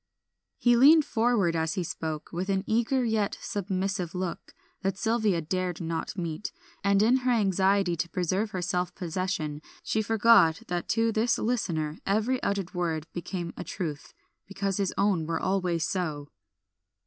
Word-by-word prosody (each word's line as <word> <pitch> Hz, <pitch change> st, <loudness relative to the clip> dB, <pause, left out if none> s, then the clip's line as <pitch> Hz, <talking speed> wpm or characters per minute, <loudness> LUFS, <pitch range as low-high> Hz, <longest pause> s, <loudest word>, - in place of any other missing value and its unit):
He 240 Hz, -1 st, +4 dB
leaned 295 Hz, +5 st, +7 dB
forward 220 Hz, -7 st, +2 dB
as 160 Hz, +2 st, 0 dB
he 185 Hz, -, -1 dB
spoke, 160 Hz, -2 st, -5 dB
with 180 Hz, +3 st, -3 dB
an 190 Hz, -1 st, +1 dB
eager 240 Hz, +4 st, +1 dB
yet 220 Hz, -3 st, 0 dB
submissive 190 Hz, -2 st, -2 dB
look, 180 Hz, -1 st, -4 dB, 0.3 s
that 195 Hz, -1 st, -1 dB
Sylvia 220 Hz, -4 st, +1 dB
dared 180 Hz, +1 st, -2 dB
not 165 Hz, +2 st, -4 dB
meet, 170 Hz, +1 st, -4 dB, 0.3 s
and 200 Hz, 0 st, +4 dB
in 240 Hz, +4 st, +5 dB
her 255 Hz, -1 st, -1 dB
anxiety 195 Hz, -4 st, +2 dB
to 170 Hz, -, -2 dB
preserve 185 Hz, +5 st, -1 dB
her 185 Hz, -3 st, -4 dB
self 180 Hz, 0 st, -1 dB
possession, 170 Hz, -4 st, -3 dB, 0.2 s
she 220 Hz, -, 0 dB
forgot 220 Hz, -6 st, +5 dB
that 175 Hz, -1 st, -2 dB
to 225 Hz, 0 st, +2 dB
this 225 Hz, +2 st, +1 dB
listener 165 Hz, -10 st, -1 dB
every 220 Hz, +6 st, +1 dB
uttered 195 Hz, -3 st, -2 dB
word 165 Hz, -4 st, -1 dB
became 175 Hz, 0 st, -4 dB
a -, -, -6 dB
truth, 155 Hz, -5 st, -5 dB, 0.3 s
because 195 Hz, 0 st, -2 dB
his 200 Hz, -2 st, 0 dB
own 195 Hz, -6 st, +2 dB
were 165 Hz, -1 st, -1 dB
always 180 Hz, -4 st, 0 dB
so. 155 Hz, -6 st, -3 dB
190 Hz, 155 wpm, -28 LUFS, 170-215 Hz, 0.3 s, leaned